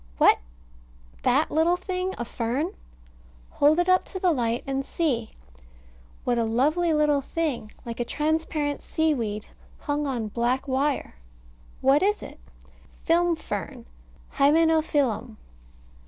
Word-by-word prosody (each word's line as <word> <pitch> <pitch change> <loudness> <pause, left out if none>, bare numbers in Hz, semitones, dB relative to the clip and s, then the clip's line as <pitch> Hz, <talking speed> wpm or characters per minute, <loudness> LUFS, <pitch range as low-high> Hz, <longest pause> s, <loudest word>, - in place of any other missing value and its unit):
What! - - +6 0.8
that - - +2
little 330 +3 +3
thing 370 0 -3
a 240 - -3
fern! 255 - -2 0.8
Hold 295 +2 +4
it 350 0 +2
up 370 0 +4
to 375 - -7
the 365 -1 +3
light, 240 -5 0
and 270 0 -2
see. 265 -7 -1 0.9
What 240 -1 +1
a - - +2
lovely 295 +10 +2
little 300 -2 +3
thing, 275 -8 -3
like 235 0 -6
a - - +1
transparent 300 +1 -1
sea 315 -1 +1
weed, 215 -5 -3 0.4
hung 290 0 -1
on 235 -5 -2
black 245 +5 -1
wire. 275 +2 0 0.7
What 270 +2 +4
is 415 +2 +1
it? - - -10 0.6
Film 345 0 +3
fern, 205 -10 -6 0.5
Hymenophyllum. 290 -6 +2
290 Hz, 125 wpm, -25 LUFS, 240-325 Hz, 0.9 s, What